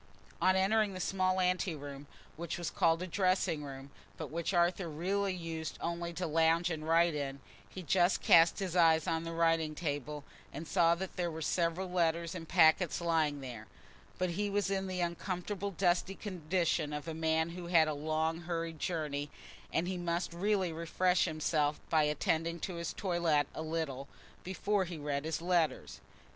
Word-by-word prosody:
On 185 +2 +4
entering 205 +2 +2
the - - -5
small 185 +1 +1
anteroom 155 -6 -2 0.3
which 170 0 -4
was 175 - -3
called 165 +1 +2
a - - -2
dressing 185 -4 +1
room, 135 0 -8 0.3
but - - -6
which 170 +2 -2
Arthur 175 0 +1
really 190 +6 -1
used 165 -2 -5
only 170 0 -3
to 180 +2 -3
lounge 165 +2 +2
and 155 -1 -4
write 165 +1 +4
in, 140 -2 -3 0.3
he 185 - -8
just 175 +3 +3
cast 165 0 +6
his 190 -3 -3
eyes 160 -2 +5
on 165 0 -1
the 165 - -4
writing 165 -2 +1
table, 150 -2 -3 0.3
and 155 +3 -7
saw 170 +1 +4
that 190 +2 -6
there 175 -1 0
were 160 0 -5
several 170 +3 0
letters 170 -2 0
and 165 -3 -7
packets 170 0 +4
lying 160 -4 +1
there; 120 -5 -8 0.5
but 185 -1 0
he 205 +4 -1
was 200 0 0
in 195 -1 -1
the 185 -1 -2
uncomfortable 180 +3 -3
dusty 185 0 +1
condition 170 -5 -1
of 150 +2 -5
a 165 - -3
man 160 0 +1
who 175 0 -7
has 175 - -6
had 160 -1 +7
a 155 - -1
long 155 +2 -1
hurried 165 -2 -4
journey, 150 -4 -2 0.4
and 170 +2 0
he 185 -1 -3
must 170 0 -2
really 190 -1 0
refresh 180 +2 +1
himself 155 -1 0
by 155 -2 +4
attending 165 +3 0
to 185 - -4
his 170 -1 -4
toilette 170 -6 +1
a - - -5
little, 155 -4 -3 0.4
before 190 +2 0
he 175 -1 -6
read 145 -1 -3
his 160 0 -3
letters. 175 -3 0
170 Hz, 180 wpm, -33 LUFS, 155-180 Hz, 0.5 s, had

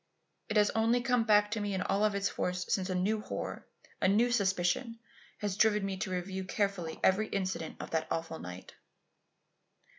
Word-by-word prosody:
It 210 - +1
has 210 0 +4
only 230 +2 +2
come 245 -2 +2
back 210 -1 +4
to 220 - -1
me 205 -1 -2
in 185 - -1
all 200 +2 +1
its 200 -1 +1
force 180 0 -2
since 190 -1 0
a 185 - -1
new 210 +4 +1
horror, - - -5 0.3
a - - +4
new 225 +5 +3
suspicion, 200 +2 +1 0.4
has 205 -2 -1
driven 210 -1 +3
me 195 -1 -2
to 185 - -3
review 185 +1 -3
carefully 185 -4 -2
every 200 +3 +3
incident 185 -4 -3
of - - -7
that 160 -1 0
awful 165 0 -3
night. 90 +1 -9
200 Hz, 180 wpm, -31 LUFS, 185-215 Hz, 0.4 s, has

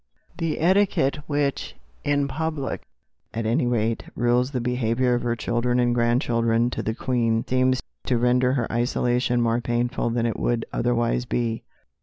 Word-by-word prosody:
The 165 -2 -1
etiquette 180 -5 +2
which, 145 -1 -1 0.3
in 145 -1 +1
public 155 -1 -3 0.5
at 115 0 -2
any 120 +2 +1
rate, 115 -1 0
rules 120 +1 +2
the 130 -3 -2
behaviour 125 0 +1
of 120 - 0
her 120 -1 0
children 120 +1 0
and 120 -1 +2
grandchildren 120 -1 +2
to - - -3
the 110 - -2
Queen, 115 -3 0
seems 130 0 +1 0.2
to 125 - +1
render 125 +1 +3
her 125 -4 0
isolation 120 +1 +1
more 115 +1 +1
painful 120 +1 -1
than 115 0 0
it 115 - -2
would 120 -1 0
otherwise 120 0 0
be. 115 -2 -1
120 Hz, 155 wpm, -24 LUFS, 115-130 Hz, 0.5 s, render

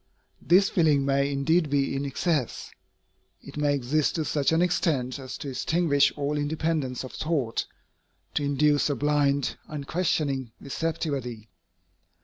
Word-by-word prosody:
This 190 +4 +5
feeling 150 -5 +2
may 140 0 +1
indeed 155 +4 +2
be 140 -1 +1
in 140 +1 -2
excess. 140 -1 -1 0.7
It - - -11
may 145 -1 +1
exist 140 +3 0
to 160 -2 -1
such 145 -1 +1
an 160 - +3
extent 150 -7 0
as 130 -1 -7
to 140 - -6
extinguish 145 0 +2
all 145 +1 -1
independence 150 -3 -1
of 130 - -8
thought, 145 -8 -1 0.7
to - - 0
induce 145 +1 +2
a 145 - 0
blind, 140 0 +1
unquestioning 140 -4 -1
receptivity. 140 -7 -3
145 Hz, 130 wpm, -26 LUFS, 135-155 Hz, 0.7 s, This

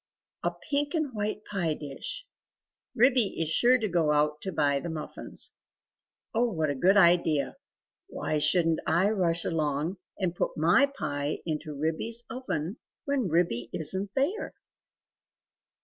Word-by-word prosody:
A - - +1
pink 290 +1 -2
and 305 -5 -1
white 210 0 -3
pie 175 -6 -1
dish! 150 - -5 0.7
Ribby 245 -4 +4
is 160 -2 0
sure 245 +9 +5
to 225 -3 -1
go 170 -5 +2
out 150 0 +1
to 190 - -4
buy 140 -4 +2
the 170 - -5
muffins..... 160 -2 -4 0.8
Oh 235 +1 +2
what 160 -5 0
a - - 0
good 185 +9 +4
idea! 170 -5 +4 0.5
Why 155 - -2
shouldn't 165 +2 +3
I 175 +6 +3
rush 170 -5 +1
along 155 +2 -1 0.2
and 185 -3 -1
put - - -2
my 170 - +5
pie 145 - -3
into 155 -2 -4
Ribby's 220 +10 0
oven 220 - -3 0.3
when 275 -8 0
Ribby 160 -8 +1
isn't 190 +5 -1
there?" 315 +11 -1
175 Hz, 140 wpm, -28 LUFS, 155-225 Hz, 0.8 s, sure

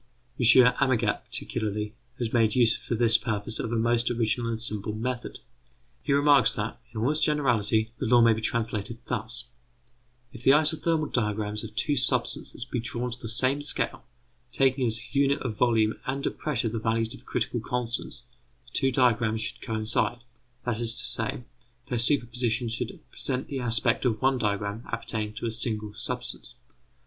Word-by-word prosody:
M. 125 - +2 0.3
Amagat, 120 -6 +1
particularly, 105 0 -1 0.2
has 120 -3 -3
made 115 -3 +3
use 120 -3 +4
for 120 - -4
this 115 0 +4
purpose 110 0 -2
of 115 - -3
a - - 0
most 115 +1 +1
original 115 0 0
and 115 -1 -3
simple 105 -2 +1
method. 120 +2 -4 0.6
He 145 - -3
remarks 145 0 +5
that, 110 +1 -4
in 115 - -6
all 120 +6 +1
its 155 - 0
generality, 115 -8 +1
the 130 - -2
law 120 +1 +5
may 115 -1 +6
be 110 - -4
translated 115 -1 -2
thus: 120 +4 -1 0.9
If 120 - -10
the 135 +2 +5
isothermal 155 +1 +2
diagrams 105 -2 -1
of 110 -1 -9
two 145 +5 0
substances 125 -2 0
be 125 -1 -3
drawn 120 +1 -3
to 120 - -6
the 115 - -7
same 130 +5 +1
scale, 145 - 0 0.5
taking 130 -1 +2
as 115 +2 -2
unit 140 0 +3
of 120 -5 -3
volume 110 -2 +2
and 135 +1 -2
of - - -3
pressure 135 -6 -1
the 115 +1 -3
values 115 0 -1
of - - -11
the - - -21
critical - - -2
constants, 120 0 -4 0.4
the 120 - -20
two 135 -1 +1
diagrams 115 -3 +2
should - - -5
coincide; 115 +2 -1 0.4
that 120 -2 -1
is 115 -1 +4
to - - +3
say, 115 +2 +1 0.5
their 125 - -1
superposition 120 -2 +2
should 115 - -4
present 130 0 -3
the 135 - -3
aspect 115 -2 +3
of 110 -4 +1
one 135 -1 +2
diagram 105 0 -2
appertaining 110 -2 -3
to 110 - -6
a 115 - -1
single 110 -2 -2
substance. 120 +1 -4
115 Hz, 175 wpm, -27 LUFS, 110-125 Hz, 0.9 s, may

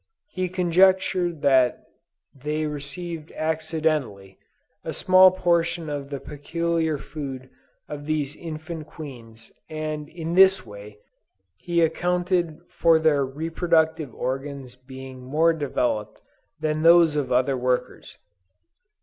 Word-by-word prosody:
He 185 -1 -2
conjectured 180 -1 +2
that 130 -3 +3 0.5
they 150 +3 -3
received 150 +2 -6
accidentally, 155 - -2 0.4
a - - -4
small 185 0 +6
portion 170 -3 0
of 140 -1 -5
the 140 -1 -5
peculiar 160 +2 -2
food 135 -3 -7 0.4
of 145 0 -8
these 150 -2 -1
infant 160 -1 -7
queens, 115 -8 -11 0.2
and 155 -1 -4
in 165 0 -5
this 190 +1 +5
way, 105 0 -11 0.6
he 170 -1 -1
accounted 175 0 0
for 165 -1 +3
their 155 -3 +2
reproductive 160 +1 0
organs 135 0 -5
being 130 0 -11
more 155 +6 +2
developed 125 -8 -2 0.4
than 155 0 -1
those 165 -1 +6
of 145 -3 -1
other 130 +2 +2
workers. 125 0 -2
155 Hz, 110 wpm, -24 LUFS, 135-170 Hz, 0.6 s, small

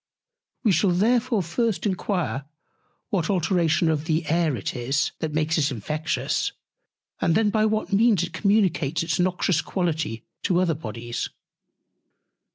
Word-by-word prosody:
We 220 - +4
shall 185 +3 +3
therefore 225 +4 +2
first 225 +6 -1
enquire 180 -7 -1 0.7
what 175 -5 0
alteration 175 -3 +2
of 155 -1 0
the 160 0 0
Air 160 -2 +1
it - - -4
is, 135 +4 0
that 160 - -2
makes 155 +1 +1
it 140 -2 +2
infectious; 155 +6 -2 0.7
and 165 - +2
then, 215 -1 +3
by 215 0 +3
what 215 -2 -1
Means 210 -3 +4
it 175 - -5
communicates 185 -6 +1
its 165 -2 -1
noxious 180 -1 +1
Quality 160 - -2 0.2
to 180 -3 +2
other 180 -3 +2
Bodies. 120 -4 -5
170 Hz, 140 wpm, -24 LUFS, 155-200 Hz, 0.7 s, We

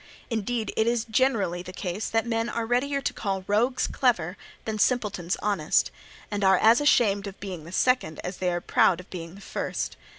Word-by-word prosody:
Indeed 225 +1 -2
it 220 - +2
is 235 -1 +1
generally 220 -7 +1
the 185 - -8
case 185 +2 -4
that 225 0 +1
men 230 0 -1
are 230 -1 -2
readier 275 +4 0
to - - -1
call 195 -3 -3
rogues 235 +6 +2
clever 185 - +1 0.3
than 220 -1 -3
simpletons 205 -7 +1
honest, 200 -7 +2 0.4
and 205 -1 -2
are 190 -1 +6
as 225 +7 +5
ashamed 205 -8 +3
of 195 - -9
being 185 -6 -6
the 170 - -10
second 250 -8 +1
as 180 +1 -5
they 180 -1 0
are 175 0 -2
proud 175 0 +3
of 180 - -13
being 170 -1 -7
the 200 - -13
first. - - -4
205 Hz, 195 wpm, -26 LUFS, 185-235 Hz, 0.4 s, are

